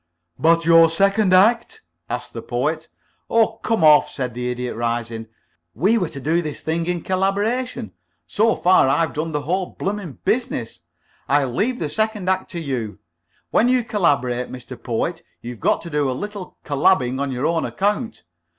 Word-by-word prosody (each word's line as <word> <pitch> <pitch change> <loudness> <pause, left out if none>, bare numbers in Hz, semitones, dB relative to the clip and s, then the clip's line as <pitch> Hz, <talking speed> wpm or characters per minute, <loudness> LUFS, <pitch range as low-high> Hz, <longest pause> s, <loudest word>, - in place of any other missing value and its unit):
"But 165 +1 +3
your 165 0 +7
second 195 +4 +2
act?" 230 - +3 0.3
asked - - -5
the - - -6
Poet. - - -2 0.4
"Oh, 225 -1 +2
come 225 -7 0
off," 150 -1 +6
said 125 -3 -4
the 125 +1 -3
Idiot, 125 0 -4
rising. 115 -1 -3 0.5
"We 200 - +2
were 180 - -1
to 140 - -8
do 160 +5 +1
this 155 -3 -6
thing 165 +1 -2
in 175 -2 -2
collaboration. 200 - -1 0.3
So 220 - +2
far, 180 -6 +4
I've 160 +4 +1
done 160 +2 -3
the 150 -1 -2
whole 180 +4 -1
blooming 195 -6 -3
business. 215 - -1 0.5
I'll 140 -2 +2
leave 240 - 0
the 160 - -2
second 215 +1 -1
act 190 0 0
to 170 - -3
you. 125 -9 -4 0.5
When 235 - +3
you 255 -1 +3
collaborate, 140 - 0
Mr. 125 0 -8
Poet, 130 +8 -2 0.2
you've 120 -1 -8
got - - +1
to 170 - -8
do 145 -2 +1
a 130 - -2
little 205 -3 -7
colabbing 140 -3 +2
on 140 -1 -2
your 130 +2 -2
own 165 0 +1
account. 210 +4 -2
165 Hz, 170 wpm, -21 LUFS, 135-205 Hz, 0.5 s, your